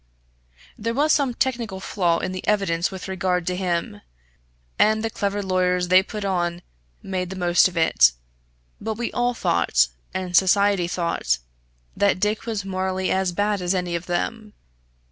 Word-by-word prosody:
There 230 Hz, +2 st, -2 dB
was 300 Hz, +3 st, +3 dB
some 270 Hz, -5 st, +1 dB
technical 235 Hz, -8 st, -1 dB
flaw 175 Hz, -3 st, 0 dB
in 185 Hz, -, -3 dB
the 185 Hz, 0 st, -6 dB
evidence 195 Hz, -5 st, +1 dB
with 190 Hz, -1 st, -7 dB
regard 185 Hz, -2 st, -1 dB
to 180 Hz, +1 st, -1 dB
him, 175 Hz, -, -2 dB, 0.8 s
and 220 Hz, +1 st, +3 dB
the 225 Hz, -, -2 dB
clever 205 Hz, -2 st, -2 dB
lawyers 180 Hz, -1 st, +1 dB
they 185 Hz, +1 st, +7 dB
put 210 Hz, +1 st, -6 dB
on 175 Hz, -2 st, -1 dB, 0.4 s
made 185 Hz, -2 st, -3 dB
the 190 Hz, -, -6 dB
most 175 Hz, -1 st, +4 dB
of 180 Hz, -2 st, -8 dB
it; 160 Hz, -, +5 dB, 0.7 s
but 220 Hz, +1 st, -3 dB
we 235 Hz, +2 st, -3 dB
all 245 Hz, 0 st, 0 dB
thought, 65 Hz, -, +2 dB, 0.2 s
and 185 Hz, -1 st, -3 dB
society 195 Hz, -1 st, +4 dB
thought, 170 Hz, -, 0 dB, 0.6 s
that 200 Hz, -2 st, +2 dB
Dick 210 Hz, +3 st, -1 dB
was 215 Hz, -4 st, -3 dB
morally 190 Hz, 0 st, -2 dB
as 190 Hz, -1 st, +1 dB
bad 205 Hz, +2 st, 0 dB
as 180 Hz, +1 st, 0 dB
any 180 Hz, -1 st, -2 dB
of 170 Hz, +1 st, -5 dB
them. 215 Hz, +4 st, -3 dB
190 Hz, 165 wpm, -23 LUFS, 175-210 Hz, 0.8 s, they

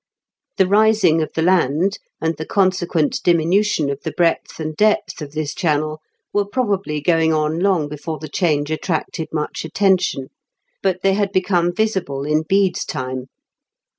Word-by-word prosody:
The 190 Hz, -, +4 dB
rising 200 Hz, -4 st, +4 dB
of 155 Hz, -, -3 dB
the 160 Hz, -, 0 dB
land, 180 Hz, +2 st, +2 dB, 0.2 s
and 160 Hz, 0 st, -1 dB
the 160 Hz, -, -6 dB
consequent 180 Hz, -5 st, +1 dB
diminution 170 Hz, -2 st, +2 dB
of 140 Hz, -, -5 dB
the 160 Hz, -, -4 dB
breadth 170 Hz, 0 st, 0 dB
and 155 Hz, -1 st, -4 dB
depth 210 Hz, -4 st, +1 dB
of 145 Hz, -1 st, -7 dB
this 155 Hz, -1 st, -3 dB
channel, 155 Hz, -2 st, -1 dB, 0.3 s
were 205 Hz, -, +2 dB
probably 200 Hz, -9 st, -1 dB
going 165 Hz, 0 st, +2 dB
on 155 Hz, +1 st, 0 dB
long 180 Hz, -5 st, +2 dB
before 150 Hz, +2 st, -5 dB
the 155 Hz, +2 st, -8 dB
change 155 Hz, -5 st, 0 dB
attracted 160 Hz, 0 st, -2 dB
much 150 Hz, -1 st, -3 dB
attention; 175 Hz, -5 st, +1 dB, 0.5 s
but 185 Hz, -2 st, -1 dB
they 195 Hz, 0 st, +4 dB
had 200 Hz, 0 st, 0 dB
become 180 Hz, -2 st, +1 dB
visible 190 Hz, -9 st, -1 dB
in 150 Hz, +1 st, +2 dB
Bede's 190 Hz, +2 st, +1 dB
time. 130 Hz, 0 st, -5 dB
165 Hz, 155 wpm, -20 LUFS, 155-190 Hz, 0.5 s, The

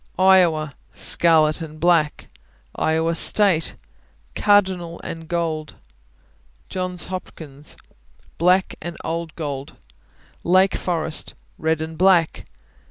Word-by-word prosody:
Iowa 175 Hz, -6 st, +4 dB, 0.2 s
Scarlet 160 Hz, -2 st, +3 dB
and 155 Hz, -1 st, -8 dB
black. 165 Hz, -2 st, +2 dB, 0.5 s
Iowa 160 Hz, +1 st, +1 dB
State 180 Hz, -2 st, +3 dB, 0.6 s
Cardinal 190 Hz, -5 st, +2 dB
and 165 Hz, -1 st, -7 dB
gold. 160 Hz, -3 st, -3 dB, 0.9 s
Johns 185 Hz, -1 st, -2 dB
Hopkins 155 Hz, -6 st, -7 dB, 0.6 s
Black 180 Hz, +3 st, +3 dB
and 175 Hz, 0 st, -6 dB
old 165 Hz, 0 st, -4 dB
gold. 140 Hz, -3 st, -5 dB, 0.7 s
Lake 185 Hz, +2 st, +4 dB
Forest 160 Hz, -3 st, -3 dB, 0.2 s
Red 160 Hz, 0 st, 0 dB
and 160 Hz, 0 st, -8 dB
black. 180 Hz, -3 st, +3 dB
165 Hz, 95 wpm, -22 LUFS, 155-180 Hz, 0.9 s, Iowa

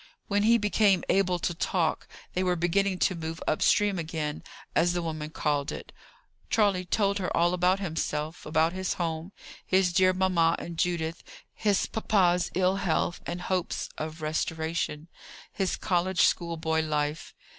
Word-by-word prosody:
When 205 Hz, 0 st, +1 dB
he 230 Hz, +3 st, +5 dB
became 205 Hz, -3 st, +3 dB
able 185 Hz, -2 st, +2 dB
to 175 Hz, -, -2 dB
talk, 165 Hz, -1 st, -1 dB, 0.3 s
they 185 Hz, -, 0 dB
were 180 Hz, -1 st, +1 dB
beginning 185 Hz, +3 st, +1 dB
to 185 Hz, -, +2 dB
move 165 Hz, -1 st, -5 dB
up 155 Hz, -, 0 dB
stream 205 Hz, -3 st, +3 dB
again, 155 Hz, -2 st, -3 dB, 0.3 s
as 175 Hz, +1 st, +3 dB
the 175 Hz, -, -1 dB
woman 155 Hz, -2 st, -4 dB
called 145 Hz, -2 st, -1 dB
it. -, -, -8 dB, 0.6 s
Charley 200 Hz, -4 st, +2 dB
told 200 Hz, +2 st, +1 dB
her 185 Hz, -, -1 dB
all 175 Hz, +1 st, +3 dB
about 180 Hz, +2 st, +2 dB
himself, 160 Hz, -3 st, -3 dB
about 160 Hz, +2 st, +1 dB
his 185 Hz, 0 st, -2 dB
home, 165 Hz, +1 st, -3 dB, 0.3 s
his 185 Hz, -2 st, +2 dB
dear 185 Hz, +1 st, +5 dB
mamma 180 Hz, -3 st, +2 dB
and 170 Hz, -, -7 dB
Judith, 170 Hz, -2 st, -1 dB, 0.3 s
his 205 Hz, -3 st, +1 dB
papa's 180 Hz, -5 st, +1 dB
ill 185 Hz, +1 st, +2 dB
health, 175 Hz, -2 st, 0 dB
and 175 Hz, +1 st, -4 dB
hopes 180 Hz, -1 st, -2 dB
of 155 Hz, +1 st, -6 dB
restoration, 160 Hz, 0 st, -2 dB, 0.5 s
his 195 Hz, -2 st, -1 dB
college 180 Hz, 0 st, 0 dB
schoolboy 160 Hz, -2 st, +1 dB
life. 150 Hz, 0 st, -2 dB
175 Hz, 155 wpm, -28 LUFS, 160-190 Hz, 0.6 s, he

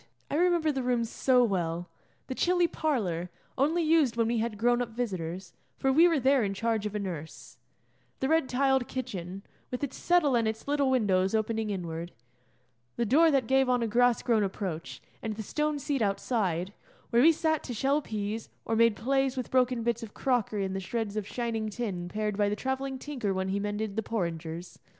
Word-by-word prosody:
I -, -, 0 dB
remember 340 Hz, -1 st, +3 dB
the 270 Hz, -2 st, -2 dB
rooms 245 Hz, -2 st, 0 dB
so 255 Hz, -2 st, +3 dB
well: 175 Hz, -5 st, -1 dB, 0.4 s
the -, -, -4 dB
chilly 355 Hz, +5 st, +2 dB
parlour, 205 Hz, -, -1 dB, 0.3 s
only 310 Hz, +6 st, +2 dB
used 310 Hz, -7 st, +3 dB
when 230 Hz, -, +3 dB
we 235 Hz, -1 st, +1 dB
had 225 Hz, -1 st, -2 dB
grown 240 Hz, +3 st, +2 dB
up 245 Hz, -, -2 dB
visitors, 185 Hz, -6 st, -4 dB, 0.2 s
for 270 Hz, 0 st, +1 dB
we 330 Hz, +5 st, +7 dB
were 330 Hz, -4 st, +2 dB
there 265 Hz, -1 st, +3 dB
in 195 Hz, -1 st, -2 dB
charge 225 Hz, 0 st, 0 dB
of 210 Hz, -, -7 dB
a -, -, 0 dB
nurse; 170 Hz, -6 st, -7 dB, 0.6 s
the 265 Hz, -, 0 dB
red 320 Hz, -2 st, +2 dB
tiled 265 Hz, -1 st, +2 dB
kitchen, 195 Hz, -7 st, -5 dB, 0.3 s
with 250 Hz, +2 st, -4 dB
its 275 Hz, -, -3 dB
settle 345 Hz, -7 st, +3 dB
and 230 Hz, -2 st, +2 dB
its 220 Hz, +3 st, -4 dB
little 285 Hz, -1 st, +2 dB
windows 195 Hz, -6 st, +2 dB
opening 220 Hz, 0 st, -1 dB
inward; 170 Hz, -3 st, -4 dB, 0.8 s
the 235 Hz, -, 0 dB
door 310 Hz, +9 st, +5 dB
that 275 Hz, -5 st, +2 dB
gave 265 Hz, +1 st, +3 dB
on 245 Hz, -1 st, +2 dB
a -, -, 0 dB
grass 240 Hz, +2 st, +3 dB
grown 230 Hz, -3 st, +3 dB
approach; 190 Hz, -4 st, -4 dB, 0.2 s
and 220 Hz, -1 st, -3 dB
the 220 Hz, -, -5 dB
stone 300 Hz, +6 st, -1 dB
seat 280 Hz, -1 st, -2 dB
outside, 195 Hz, -3 st, 0 dB, 0.4 s
where 235 Hz, -, +5 dB
we 320 Hz, +5 st, +8 dB
sat 315 Hz, -1 st, 0 dB
to 250 Hz, -, -4 dB
shell 275 Hz, +6 st, +2 dB
peas, 215 Hz, -2 st, -4 dB, 0.2 s
or 225 Hz, -, 0 dB
made 230 Hz, -1 st, +4 dB
'plays' 270 Hz, +3 st, 0 dB
with 255 Hz, -, -4 dB
broken 250 Hz, -2 st, +2 dB
bits 235 Hz, 0 st, 0 dB
of 225 Hz, -3 st, -9 dB
crockery 225 Hz, -6 st, 0 dB
and 190 Hz, 0 st, -3 dB
the -, -, -1 dB
shreds 210 Hz, +2 st, -3 dB
of 210 Hz, -2 st, -3 dB
shining 225 Hz, -2 st, -2 dB
tin 200 Hz, -6 st, -4 dB
pared 210 Hz, +1 st, -2 dB
by 205 Hz, -1 st, +2 dB
the 205 Hz, -, -1 dB
travelling 265 Hz, +3 st, -3 dB
tinker 255 Hz, -8 st, -3 dB
when 190 Hz, 0 st, -1 dB
he 195 Hz, +1 st, 0 dB
mended 205 Hz, 0 st, -3 dB
the 220 Hz, -, 0 dB
porringers. 170 Hz, -5 st, -4 dB
230 Hz, 200 wpm, -29 LUFS, 200-265 Hz, 0.8 s, we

